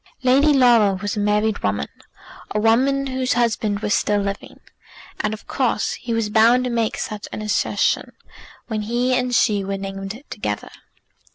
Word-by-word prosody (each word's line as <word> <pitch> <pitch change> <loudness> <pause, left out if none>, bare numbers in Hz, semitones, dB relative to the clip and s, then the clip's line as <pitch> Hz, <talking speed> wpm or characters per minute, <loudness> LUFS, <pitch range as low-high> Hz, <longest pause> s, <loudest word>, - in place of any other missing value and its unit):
Lady 270 +4 +4
Laura 240 -7 +5
was 205 +1 -4
a - - -2
married 210 +1 +1
woman, 100 -7 -1 0.7
a - - +2
woman 260 +5 +2
whose 260 -1 -1
husband 220 -3 0
was 210 -1 0
still 205 0 +1
living, 200 0 -5 0.6
and 215 - -1
of 215 - -7
course 245 -5 -1
he 240 - -6
was 225 -2 0
bound 230 +3 +5
to 250 - -2
make 230 -2 -1
such 210 -1 -5
an 215 - -5
assertion 210 - 0 0.5
when 220 -2 -3
he 240 +4 0
and 250 -1 0
she 205 -3 +2
were 195 0 -3
named 195 +2 -6
together. 105 - -4
220 Hz, 165 wpm, -21 LUFS, 205-245 Hz, 0.7 s, Laura